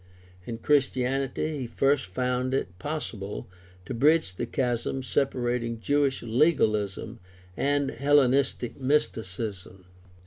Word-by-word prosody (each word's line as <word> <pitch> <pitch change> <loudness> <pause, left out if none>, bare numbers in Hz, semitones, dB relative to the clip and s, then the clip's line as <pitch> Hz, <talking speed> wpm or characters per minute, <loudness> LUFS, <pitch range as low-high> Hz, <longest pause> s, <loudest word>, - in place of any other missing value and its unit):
In 115 - -4
Christianity 135 +3 0
he 125 - -3
first 135 +1 +1
found 125 +6 -1
it 90 -8 -3
possible 115 -10 -4 0.4
to - - -5
bridge 150 - +3
the - - -4
chasm 130 -1 -1
sepa 135 +1 0
rating 120 -2 -1
Jewish 140 +2 +1
legalism 110 - +1 0.4
and 140 +2 +1
Hellenistic 140 -3 +2
mysticism. 105 -9 -2
130 Hz, 105 wpm, -27 LUFS, 115-140 Hz, 0.4 s, bridge